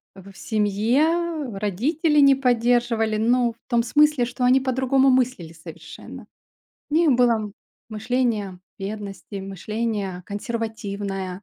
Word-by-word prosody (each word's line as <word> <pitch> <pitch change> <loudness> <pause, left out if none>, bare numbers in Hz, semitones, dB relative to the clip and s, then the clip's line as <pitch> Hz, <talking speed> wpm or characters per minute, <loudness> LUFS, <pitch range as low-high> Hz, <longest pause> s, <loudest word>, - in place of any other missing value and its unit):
В 195 0 -13
в 195 - -18
семье 270 - 0
родители 290 - 0
не 275 -1 +6
поддерживали. 240 -3 +1
Ну, 235 +1 +2
в 230 - -41
том 235 -2 +2
смысле, 295 0 +3
что 245 +1 -5
они 255 +2 +5
по-другому 265 +1 +2
мыслили 250 -11 0
совершенно. 160 0 -11 0.6
У - - -2
них 325 -2 +4
было 245 -1 +4
м 215 -2 -3 0.4
мышление 220 -3 -2 0.2
бедности, 200 -2 -7
мышление 195 0 -4
консервативное. 200 -3 -5
230 Hz, 120 wpm, -23 LUFS, 200-255 Hz, 0.6 s, не